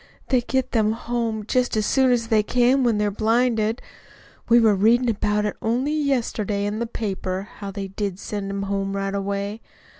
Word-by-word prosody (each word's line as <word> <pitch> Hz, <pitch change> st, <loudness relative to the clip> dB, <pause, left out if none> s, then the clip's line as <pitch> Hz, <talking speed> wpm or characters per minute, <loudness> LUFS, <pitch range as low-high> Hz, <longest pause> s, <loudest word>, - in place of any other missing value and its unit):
"They 255 Hz, -2 st, +3 dB
get 260 Hz, +1 st, -1 dB
them 220 Hz, -2 st, +2 dB
home 230 Hz, -2 st, -3 dB
just 245 Hz, 0 st, 0 dB
as 215 Hz, -, +1 dB
soon 265 Hz, +1 st, +3 dB
as 230 Hz, -2 st, 0 dB
they 220 Hz, -2 st, +4 dB
can 250 Hz, +4 st, +2 dB
when 235 Hz, -3 st, +2 dB
they're 210 Hz, 0 st, +1 dB
blinded. 225 Hz, +1 st, +1 dB, 0.7 s
We 235 Hz, +1 st, +7 dB
were 220 Hz, -2 st, +5 dB
readin' 230 Hz, +5 st, +3 dB
about 210 Hz, -1 st, 0 dB
it 210 Hz, -, -2 dB
only 250 Hz, +7 st, 0 dB
yesterday 230 Hz, -8 st, -1 dB
in 205 Hz, +1 st, -2 dB
the 235 Hz, -, -2 dB
paper 195 Hz, -3 st, -4 dB
how 200 Hz, -1 st, -6 dB
they 195 Hz, 0 st, -5 dB
did 195 Hz, -1 st, -3 dB
send 200 Hz, 0 st, -5 dB
'em 200 Hz, 0 st, -3 dB
home 195 Hz, 0 st, -2 dB
right 195 Hz, 0 st, -2 dB
away. 200 Hz, +2 st, -3 dB
215 Hz, 185 wpm, -23 LUFS, 200-240 Hz, 0.7 s, We